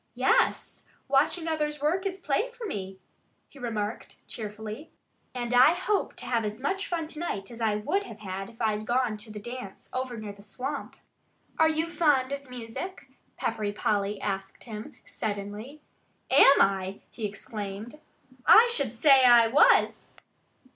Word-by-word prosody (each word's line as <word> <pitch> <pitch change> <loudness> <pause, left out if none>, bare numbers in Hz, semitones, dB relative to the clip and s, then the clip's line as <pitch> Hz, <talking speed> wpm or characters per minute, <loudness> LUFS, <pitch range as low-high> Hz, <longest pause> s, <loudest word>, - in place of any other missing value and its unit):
"Yes! - - +1 0.2
Watching 290 +5 +2
others 300 -2 -1
work 350 +7 0
is 380 0 -5
play 355 - 0
for 475 -1 -9
me," 195 - -5 0.5
he 280 - -16
remarked 220 -3 -4
cheerfully. 220 +5 -7 0.5
"And 240 -1 -3
I 255 +7 +7
hope 395 +3 -1
to - - -9
have 235 -2 0
as 210 0 -4
much 380 +9 -2
fun 335 -2 -2
to 310 -1 -8
night 210 - -4
as 235 0 -9
I 220 -2 +2
would 300 - 0
have - - -11
had 195 -1 -5
if 230 - -18
I'd 215 -2 -1
gone 245 -2 +1
to 215 +1 -9
the 210 - -7
dance 240 -2 -8
over 255 -2 -3
near 215 -2 -6
the 200 - -16
swamp." 210 +6 -5 0.6
"Are 320 0 +6
you 315 +1 0
fond 295 -6 +2
of 280 -1 -5
music?" 250 +6 -7 0.3
Peppery 215 -2 -2
Polly 205 -1 -1
asked 195 -1 -4
him 215 -2 -8
suddenly. 210 +7 -5 0.5
"Am 275 - +7
I?" 195 0 +1
he 220 -3 -3
exclaimed. 210 +6 -7 0.5
"I 470 +2 +8
should 260 - -1
say 265 +2 +6
I 240 -2 +7
was!" 270 - +4
240 Hz, 160 wpm, -28 LUFS, 210-300 Hz, 0.6 s, I